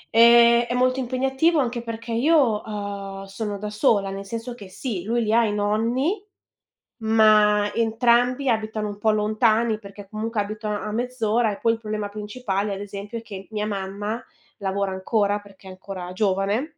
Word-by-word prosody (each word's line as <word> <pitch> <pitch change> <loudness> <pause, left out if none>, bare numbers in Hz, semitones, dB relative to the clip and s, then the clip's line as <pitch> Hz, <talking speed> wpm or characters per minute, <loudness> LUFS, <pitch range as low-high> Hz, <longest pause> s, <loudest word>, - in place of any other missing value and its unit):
Ehm, 235 0 +7
è 245 - -2
molto 255 +1 +2
impegnativo, 265 +6 +1
anche 240 -2 -1
perché 230 0 -6
io, 250 -4 +3
uhm, 200 -2 -5
sono 200 +1 -4
da 210 +1 -5
sola, 210 -3 +2
nel 195 0 -6
senso 230 +4 -5
che 205 -5 -11
sì, 195 -1 -4
lui 235 +2 0
li 215 - 0
ha 235 +1 +5
i 210 - 0
nonni, 235 - 0 0.8
ma 215 -2 +4
entrambi 240 +3 +2
abitano 220 -2 -1
un 205 - -6
po' 220 +1 +2
lontani, 215 +1 +2
perché 200 -1 -12
comunque 220 0 -2
abitano 210 0 -3
a 210 - -4
mezz'ora, 235 -2 0
e 200 - -7
poi 230 - +3
il 225 - -8
problema 215 -2 -3
principale, 210 -1 -3
ad 195 - -7
esempio, 205 +3 -6
è - - -9
che 195 -4 -9
mia 210 -1 -2
mamma 205 +3 -4 0.4
lavora 195 -1 -1
ancora, 205 +2 0
perché 200 -1 -18
è - - -8
ancora 185 -1 -7
giovane 200 +5 +1
215 Hz, 170 wpm, -23 LUFS, 205-235 Hz, 0.8 s, Ehm